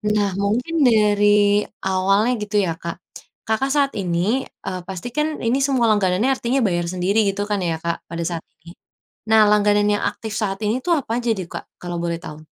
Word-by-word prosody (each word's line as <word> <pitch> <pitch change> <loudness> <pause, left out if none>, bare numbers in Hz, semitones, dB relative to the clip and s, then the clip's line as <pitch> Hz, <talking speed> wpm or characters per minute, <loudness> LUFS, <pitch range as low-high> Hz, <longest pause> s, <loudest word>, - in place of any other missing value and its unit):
Nah 205 -2 +1
mungkin 245 +11 0
dari 205 -2 +4 0.2
awalnya 195 +5 +2
gitu 210 0 -6
ya 170 -4 -1
Kak. 170 +1 -6 0.5
Kakak 265 +5 0
saat 280 -2 +2
ini, 190 +7 0 0.2
eee, 185 -1 -3
pasti 190 +5 -6
kan 305 0 -1
ini 235 +3 +1
semua 255 -5 +2
langganannya 205 +4 +2
artinya 255 +2 0
bayar 175 -1 -1
sendiri 190 +4 +1
gitu 195 +1 -1
kan 205 -1 0
ya 165 - 0
Kak, 170 0 -3
pada 170 0 -5
saat 170 -2 -4 0.2
ini. 170 +2 -13 0.5
Nah 220 -1 +6
langganan 205 0 +3
yang 205 - 0
aktif 220 -2 -5
saat 195 -3 -2
ini 225 +5 0
itu 355 - -5
apa 275 -6 -4
aja 235 - -2
deh 185 - -4
Kak - - -7
kalau 175 -1 -5
boleh 170 -1 -2
tahu? 155 -2 -10
205 Hz, 190 wpm, -21 LUFS, 180-230 Hz, 0.5 s, Nah